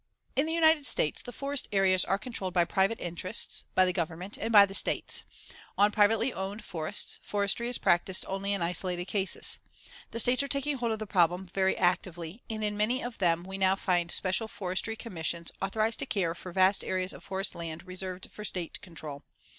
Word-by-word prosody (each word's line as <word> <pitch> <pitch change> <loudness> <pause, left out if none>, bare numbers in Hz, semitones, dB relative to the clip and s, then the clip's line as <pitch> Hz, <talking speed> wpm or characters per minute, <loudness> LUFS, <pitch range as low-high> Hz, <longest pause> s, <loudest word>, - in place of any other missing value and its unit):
In 280 +4 +2
the 320 - -1
United 320 -3 +4
States, 150 - +1
the 245 - -8
forest 280 +2 0
areas 190 -2 +4
are 195 - +1
controlled 195 -5 -3
by 175 -1 +5
private 195 +5 +1
interests, 175 +5 -3
by 185 - +6
the 180 - 0
Government 175 +2 -3
and 225 - -3
by 205 -2 +9
the 195 - -9
States. - - +1 0.6
On 205 +1 +5
privately 225 +4 +3
owned 195 +3 -5
forests, 160 +4 -2
Forestry 205 +3 -1
is 245 - +1
practiced 180 +2 +2
only 195 +1 -2
in 200 -4 0
isolated 175 +1 -1
cases. 195 0 -2 0.5
The 230 - -4
States 245 +3 +5
are 280 - -1
taking 280 +1 -1
hold 235 -2 -1
of 220 - -1
the 215 - -5
problem 180 -1 +2
very 190 -1 +2
actively 175 +1 -1
and 215 -1 -3
in 210 0 0
many 235 +5 +1
of 245 -1 -6
them 170 -2 +2
we 190 +1 -6
now 190 0 +4
find 175 -3 0
special 190 +5 +2
Forestry 195 +2 -2
Commissions 170 -6 -3
authorized 215 +3 0
to - - -1
care 180 -5 0
for 180 +1 -9
vast 190 +2 +3
areas 185 0 -1
of - - -12
forest 190 0 -2
land 165 +1 -6
reserved 185 0 -6
for 210 - -9
State 180 -5 -3
control. 155 -5 -7
195 Hz, 195 wpm, -29 LUFS, 180-220 Hz, 0.6 s, by